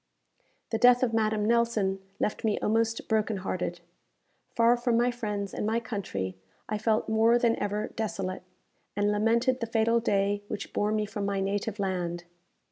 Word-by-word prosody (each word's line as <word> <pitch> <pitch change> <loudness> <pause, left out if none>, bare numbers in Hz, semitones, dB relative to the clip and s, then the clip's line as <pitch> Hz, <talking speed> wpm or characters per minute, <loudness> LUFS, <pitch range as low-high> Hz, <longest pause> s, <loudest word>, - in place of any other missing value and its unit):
The 225 - 0
death 245 +1 +6
of 235 -3 +1
Madame 215 -1 +1
Nelson 225 -4 +1 0.2
left 210 - -1
me 215 -2 +1
almost 225 +1 0
broken 220 -1 +1
hearted. 180 -2 -3 0.7
Far 235 +1 +5
from 240 -1 +1
my 240 +1 +3
friends 210 -4 -4
and - - -3
my 220 +2 +1
country, 140 - -4 0.3
I 215 0 -2
felt 220 0 +1
more 225 +2 +4
than 235 -1 +2
ever 205 +1 -2
desolate, 195 -4 -3 0.5
and 205 +1 +2
lamented 235 +5 +2
the 230 - -3
fatal 230 +1 +2
day 200 -2 +1
which 205 -1 -6
bore 210 +1 +1
me 215 -1 0
from 205 -1 -4
my 200 -1 -1
native 200 +2 -2
land. 180 -3 -2
215 Hz, 165 wpm, -28 LUFS, 200-230 Hz, 0.7 s, death